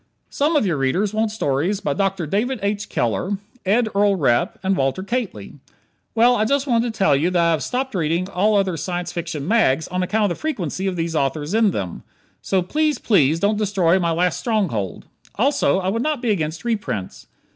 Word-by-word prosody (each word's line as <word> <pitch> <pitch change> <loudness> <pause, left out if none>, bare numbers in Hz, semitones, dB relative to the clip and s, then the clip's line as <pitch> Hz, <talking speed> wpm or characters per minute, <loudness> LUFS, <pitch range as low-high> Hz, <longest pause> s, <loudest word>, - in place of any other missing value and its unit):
Some 300 +3 +1
of 290 - +3
your 170 -6 0
readers 180 +10 0
want 220 0 +1
stories 185 -1 -1
by 145 - -1
Dr. 195 +1 -1
David 225 - -1
H. 200 0 -2
Keller, 180 - -1 0.3
Ed 225 +4 +3
Earl 200 0 +3
Repp 120 -7 +1
and 190 0 +1
Walter 135 +5 -1
Kately. 195 - -4 0.6
Well, 240 +2 +5
I 215 - +1
just 275 +5 +1
wanted 235 -3 +1
to 220 - -14
tell 155 -7 +4
you 155 +6 +1
that 180 -1 +1
I 170 0 +3
have 160 - 0
stopped 260 +1 -2
reading 170 0 0
all 205 +2 +2
other 190 -4 0
Science 175 +3 -3
Fiction 165 -4 -4
"mags" 170 - +2
on 180 +1 -1
account 205 +2 +1
of - - -2
the - - -19
frequency 195 - -2
of 190 - -1
these 165 -1 -2
authors 145 +3 -1
in 220 -1 +4
them. 95 - -4 0.4
So 190 -2 0
please, 300 - 0
please, 160 - +2
don't 205 +3 +1
destroy 190 -4 +2
my 170 -2 0
last 175 +1 +1
stronghold. 175 - -2 0.3
Also, 270 -2 +2
I 190 0 -1
would 225 +4 -1
not 300 0 0
be 240 -3 0
against 160 -1 -2
reprints. 205 - -3
190 Hz, 200 wpm, -21 LUFS, 165-220 Hz, 0.6 s, Well